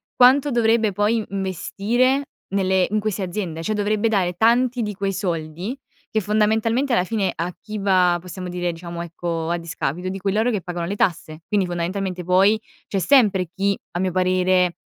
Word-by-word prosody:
quanto 265 Hz, +3 st, +5 dB
dovrebbe 225 Hz, -2 st, +3 dB
poi 210 Hz, +3 st, +1 dB
investire 215 Hz, -, 0 dB, 0.2 s
nelle 190 Hz, -1 st, +2 dB
in 215 Hz, -, +2 dB
queste 210 Hz, -2 st, -2 dB
aziende? 175 Hz, -3 st, -4 dB
Cioè 215 Hz, -, -1 dB
dovrebbe 210 Hz, +1 st, +1 dB
dare 190 Hz, -5 st, +1 dB
tanti 240 Hz, +5 st, +2 dB
di 210 Hz, -1 st, -3 dB
quei 195 Hz, 0 st, -2 dB
soldi, 175 Hz, -, -3 dB, 0.4 s
che, 220 Hz, -, +1 dB
fondamentalmente, 220 Hz, +5 st, +1 dB
alla 205 Hz, -, +3 dB
fine 195 Hz, -1 st, -1 dB
a 170 Hz, +2 st, -2 dB
chi 215 Hz, 0 st, -6 dB
va, 185 Hz, -3 st, +3 dB
possiamo 180 Hz, +1 st, -7 dB
dire, 180 Hz, 0 st, -2 dB
diciamo, 170 Hz, 0 st, -7 dB
ecco, 170 Hz, -1 st, -4 dB
a 170 Hz, -, 0 dB
discapito, 170 Hz, +1 st, -3 dB
di 195 Hz, +1 st, -5 dB
cui 195 Hz, +1 st, -1 dB
loro 220 Hz, +4 st, +2 dB
che 210 Hz, -4 st, -1 dB
pagano 175 Hz, -1 st, -4 dB
le 195 Hz, +4 st, -3 dB
tasse. 160 Hz, -4 st, -1 dB
Quindi 205 Hz, -3 st, +1 dB
fondamentalmente 180 Hz, +1 st, -3 dB
poi, 190 Hz, +5 st, +4 dB, 0.3 s
c'è 195 Hz, -, -1 dB
sempre 200 Hz, -6 st, +4 dB
chi, 200 Hz, +1 st, +1 dB, 0.2 s
a 175 Hz, -, -3 dB
mio 185 Hz, 0 st, 0 dB
parere, 185 Hz, 0 st, +2 dB
195 Hz, 175 wpm, -22 LUFS, 180-215 Hz, 0.4 s, quanto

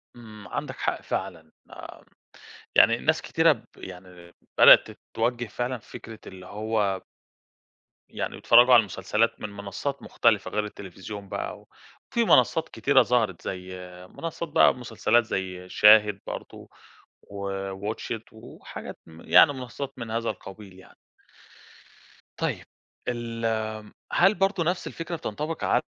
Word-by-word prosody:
إمم 110 Hz, -3 st, -12 dB
عندك -, -, -5 dB
حق -, -, -2 dB
فعلًا، 80 Hz, -4 st, -5 dB, 0.2 s
آمم -, -, -12 dB, 0.7 s
يعني 115 Hz, -, +6 dB
ناس 160 Hz, +5 st, +1 dB
كتيرة 165 Hz, 0 st, +3 dB
ب -, -, -8 dB
يعني 90 Hz, -2 st, -12 dB, 0.3 s
بدئت -, -, +8 dB, 0.2 s
تتوجه 120 Hz, +2 st, 0 dB
فعلًا 125 Hz, +3 st, -3 dB
فكرة 110 Hz, 0 st, -11 dB
اللي 90 Hz, -1 st, -11 dB
هو 105 Hz, -2 st, -1 dB, 1.1 s
يعني -, -, -5 dB
يتتفرجوا 120 Hz, +2 st, +6 dB
على 120 Hz, -, +9 dB
المسلسلات 105 Hz, +2 st, -1 dB
من 105 Hz, -, -4 dB
منصات 100 Hz, +8 st, -5 dB
مختلفة 110 Hz, -4 st, +1 dB
غير 105 Hz, 0 st, -1 dB
التليفزيون 100 Hz, 0 st, -9 dB
بقى، -, -, -5 dB, 0.5 s
وفي 235 Hz, -, +1 dB
منصات 160 Hz, -, +3 dB
كتيرة 135 Hz, -1 st, +3 dB
ظهرت 110 Hz, -7 st, 0 dB
زي 95 Hz, 0 st, -6 dB, 0.3 s
منصات 165 Hz, 0 st, -6 dB
بقى -, -, +5 dB
مسلسلات 120 Hz, -1 st, +1 dB
زي 90 Hz, -3 st, -4 dB
شاهد 105 Hz, -1 st, +6 dB
برضه -, -, -8 dB, 0.5 s
و 100 Hz, -1 st, -6 dB, 0.4 s
Watch 115 Hz, -, -5 dB
it، 110 Hz, -, -18 dB
وحاجات 110 Hz, 0 st, -10 dB
م 80 Hz, 0 st, -14 dB
يعني 145 Hz, -, +6 dB
منصات 135 Hz, +1 st, -7 dB
من 115 Hz, -2 st, -6 dB
هذا 115 Hz, +1 st, -1 dB
القبيل 95 Hz, -1 st, -9 dB
يعني. -, -, -18 dB, 1.4 s
طيب، -, -, -3 dB, 0.4 s
ال 115 Hz, -1 st, -4 dB
آمم 110 Hz, -1 st, -3 dB, 0.2 s
هل 195 Hz, +4 st, +4 dB
برضه 195 Hz, -1 st, +1 dB
نَفْس 175 Hz, +2 st, -2 dB
الفكرة 170 Hz, +1 st, -5 dB
بتنطبق 155 Hz, +2 st, -5 dB
على -, -, +2 dB
110 Hz, 130 wpm, -26 LUFS, 100-125 Hz, 1.4 s, على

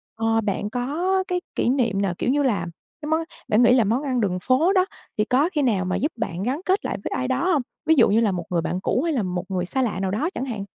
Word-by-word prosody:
ờ, 225 Hz, 0 st, +1 dB
bạn 205 Hz, -1 st, -2 dB
có 320 Hz, -, 0 dB
cái 360 Hz, 0 st, -1 dB
kỷ -, -, +1 dB
niệm 235 Hz, -7 st, +1 dB
nào, 195 Hz, -3 st, 0 dB
kiểu -, -, -1 dB
như 285 Hz, +2 st, +2 dB
là 235 Hz, -9 st, +1 dB, 0.4 s
cái 300 Hz, -, -5 dB
món 320 Hz, +1 st, +1 dB, 0.2 s
bạn 215 Hz, +3 st, +3 dB
nghĩ 240 Hz, -, +6 dB
là 250 Hz, -2 st, +5 dB
món 230 Hz, +7 st, 0 dB
ăn 255 Hz, -4 st, 0 dB
đường 185 Hz, -4 st, 0 dB
phố 275 Hz, -, +3 dB
đó, 370 Hz, -2 st, +4 dB, 0.3 s
thì 210 Hz, -, +2 dB
có 275 Hz, +8 st, +2 dB
khi 300 Hz, -, +1 dB
nào 210 Hz, -9 st, +1 dB
mà 185 Hz, -, -1 dB
giúp 295 Hz, +5 st, 0 dB
bạn 190 Hz, -5 st, -3 dB
gắn 265 Hz, +8 st, -1 dB
kết 385 Hz, +3 st, +1 dB
lại -, -, -2 dB
với -, -, -4 dB
ai 255 Hz, -, -1 dB
đó 265 Hz, +8 st, +1 dB
hông? 295 Hz, -, +2 dB, 0.2 s
Ví 320 Hz, 0 st, +5 dB
dụ 240 Hz, -7 st, +5 dB
như 210 Hz, +3 st, +3 dB
là 225 Hz, -3 st, +2 dB
một 180 Hz, -2 st, -3 dB
người 175 Hz, -2 st, 0 dB
bạn 180 Hz, +3 st, -2 dB
cũ 250 Hz, -, +1 dB
hay 330 Hz, -1 st, 0 dB
là 245 Hz, -7 st, 0 dB
một 180 Hz, -1 st, -3 dB
người 185 Hz, -2 st, -1 dB
xa 265 Hz, +9 st, -1 dB
lạ 225 Hz, -7 st, -1 dB
nào 190 Hz, -1 st, -1 dB
đó 275 Hz, -, 0 dB
chẳng 260 Hz, -, -3 dB
hạn. 220 Hz, -6 st, -4 dB
245 Hz, 290 wpm, -23 LUFS, 200-290 Hz, 0.4 s, nghĩ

